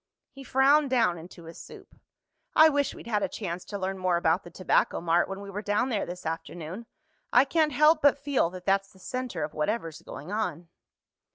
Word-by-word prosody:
He 275 0 -11
frowned 275 +3 +4
down 230 -10 +2
into 170 +1 -12
his 165 +1 -11
soup. - - -13 0.6
"I 315 0 +8
wish 285 -2 0
we'd - - -11
had 215 -3 0
a - - +1
chance 180 -4 -5
to 205 - -5
learn 190 0 -3
more 185 -2 +1
about 170 +2 +2
the - - -11
Tobacco 185 +1 +1
Mart 170 +1 +1
when 195 +1 -6
we 200 0 -8
were 205 +1 -4
down 210 +5 0
there 215 -5 -1
this 180 0 -8
afternoon. 165 +5 -6 0.4
I 250 +3 +6
can't 310 +1 +1
help 305 +3 +4
but 285 0 +5
feel 280 -10 0
that 180 0 -10
that's 195 0 +1
the - - -20
center 245 - -4
of 150 - -5
whatever's 165 0 -2
going 150 +7 -9
on." 175 -6 -3
195 Hz, 205 wpm, -27 LUFS, 175-260 Hz, 0.6 s, I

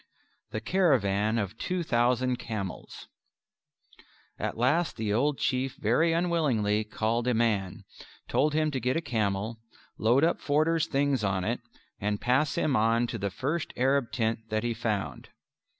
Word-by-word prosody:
The 110 - -4
Caravan 110 - +2
of 105 0 -3
Two 180 -1 -2
Thousand 125 -1 +1
Camels 105 -6 -6 1.3
At - - -3
last 145 +8 +1
the 110 -2 -1
old 140 +5 +1
Chief 130 0 -1
very 125 +10 +2
unwillingly 140 -12 +1
called 115 +3 -1
a 125 - +2
man, 105 -3 0 0.4
told 150 +2 +1
him 155 -1 +2
to 135 - -2
get 125 +4 0
a - - 0
camel, 110 -4 -2 0.4
load 120 +6 +3
up 170 - +2
Forder's 155 +2 +2
things 140 -4 +1
on 95 -2 0
it, - - -1 0.4
and 105 0 -1
pass 135 +5 +1
him 145 - +1
on 115 +2 +3
to 115 -1 -5
the 100 +1 -1
first 150 - -3
Arab 130 -1 +2
tent 115 -2 0
that 110 +1 -1
he 120 -1 0
found. 110 -3 -3
120 Hz, 150 wpm, -28 LUFS, 110-145 Hz, 1.3 s, load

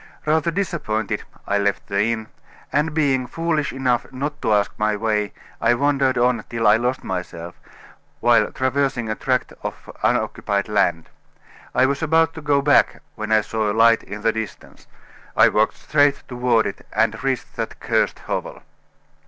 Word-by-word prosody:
Rather 155 +1 +2
disappointed, 160 - -2 0.2
I 100 0 +1
left 100 0 0
the 100 +1 0
inn, 115 0 -1 0.5
and 150 +3 +2
being 140 -5 +1
foolish 155 +1 -1
enough 130 -2 -1
not 145 +3 -4
to - - 0
ask 105 -1 +2
my 105 0 +1
way, 105 -1 0 0.3
I 115 +1 +4
wandered 135 -1 +1
on 120 -2 +2
till 115 -1 -2
I 105 +1 +6
lost 125 +3 -1
myself, 90 -2 -6 0.6
while - - +3
traversing 130 -3 0
a - - +1
tract 130 +1 -1
of - - -7
unoccupied 100 -1 0
land. 95 -6 +1 0.7
I 130 - +5
was 140 +1 -1
about 160 0 +3
to 160 - -8
go 145 -2 +2
back, 145 0 +3
when 110 0 -5
I 110 0 +5
saw 110 -1 -1
a 105 - -3
light 115 0 +5
in 105 +1 -8
the 115 - +3
distance. 110 -3 -7 0.5
I - - +7
walked - - +1
straight 145 -1 +2
toward 125 -2 +1
it, 100 - -5
and 110 +1 +1
reached 135 -2 -2
that - - -4
cursed - - 0
hovel." - - -4
120 Hz, 165 wpm, -22 LUFS, 110-140 Hz, 0.7 s, I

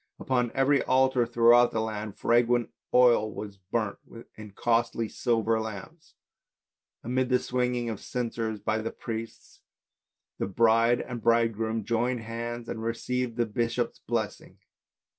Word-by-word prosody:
Upon 125 -3 0
every 135 +1 +3
altar 130 -2 +2
throughout 120 +1 +5
the 110 - -1
land 110 -2 -4
fragrant 120 0 +2 0.2
oil 120 -4 +4
was 100 -2 -8
burnt 100 +2 -3 0.4
in 110 -1 -10
costly 115 +2 0
silver 115 -1 0
lamps. 110 - -8 0.9
Amidst 125 +2 0
the 125 - +4
swinging 125 -1 -1
of 110 -3 -4
censers 115 -3 -3
by 110 +2 -1
the 110 +1 -3
priests, 115 0 -8 0.8
the - - -1
bride 115 +3 +3
and 120 -2 -6
bridegroom 115 -1 +1
joined 115 +2 0
hands 115 +1 -5
and 110 - -5
received 120 +1 -2
the 120 - +2
bishop's 115 +2 -2
blessing. - - -4
115 Hz, 130 wpm, -27 LUFS, 110-120 Hz, 0.9 s, throughout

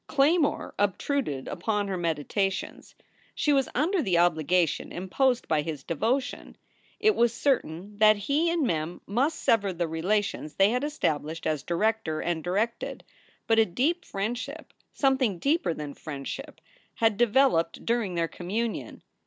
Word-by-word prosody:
Claymore 290 +2 +2
obtruded 205 - -1
upon 210 -2 -1
her 195 - -2
meditations. 175 +3 -2 0.4
She 295 - +2
was 270 -2 +2
under 335 +7 +2
the 185 - +1
obligation 170 -1 +2
imposed 245 +8 0
by 155 -2 +2
his 150 -2 -5
devotion. 250 - -2 0.4
It 430 -1 +4
was 235 -1 +3
certain 205 - -1
that 215 0 +6
he 285 - +1
and 335 -4 +1
Mem 165 -3 -2
must 270 +10 0
sever 205 -4 +2
the 175 -1 -2
relations 175 0 -1
they 195 +2 +4
had 250 +3 0
established 160 - -2
as 155 -3 0
director 170 0 0
and 170 -2 -2
directed, 210 +6 -2 0.4
but 225 0 +3
a 225 - +6
deep 310 - 0
friendship, 245 +9 -5 0.2
something 265 -8 +1
deeper 280 - +1
than 150 -3 -5
friendship, 155 - -7 0.3
had 225 -3 +2
developed 235 -7 +2
during 230 -6 0
their 165 -1 +1
communion. 210 +8 -4
205 Hz, 140 wpm, -27 LUFS, 170-265 Hz, 0.4 s, that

